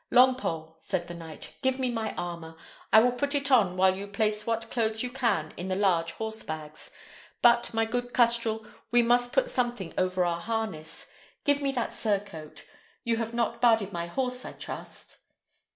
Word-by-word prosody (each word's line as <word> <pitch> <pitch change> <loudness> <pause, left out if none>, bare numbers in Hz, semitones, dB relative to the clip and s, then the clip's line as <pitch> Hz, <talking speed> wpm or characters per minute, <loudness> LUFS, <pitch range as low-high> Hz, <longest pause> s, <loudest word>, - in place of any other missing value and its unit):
"Longpole," 245 -11 +3
said 185 -3 -2
the 175 - -7
knight, 165 -2 -10
"give 260 0 +1
me 255 -2 0
my 225 -2 -3
armour; 170 -2 -5 0.4
I 220 - +9
will 250 +2 +4
put 280 +4 -1
it 280 -1 +1
on 195 -8 +4
while 190 0 +4
you 200 +1 -6
place 210 +1 -1
what 230 0 -2
clothes 220 -2 0
you 250 - -3
can 230 - 0
in 180 - -4
the 185 - -1
large 175 -4 +2
horsebags. 155 -9 -6 0.5
But, 240 0 +5
my 225 -1 +1
good 245 +2 -3
custrel, 230 -2 +2 0.2
we 240 +1 +4
must 245 +1 +3
put - - +2
something 240 - -1
over 185 0 +1
our 170 -1 -1
harness: 210 -8 -4 0.3
give 285 0 +2
me 275 -1 +1
that 240 -3 -2
surcoat. 200 -8 -3 0.4
You 235 -2 +1
have 230 0 -3
not 235 0 -1
barded 225 -5 +4
my 170 -1 -3
horse, 250 +5 -1
I - - -7
trust?" - - -8
220 Hz, 180 wpm, -28 LUFS, 185-245 Hz, 0.5 s, I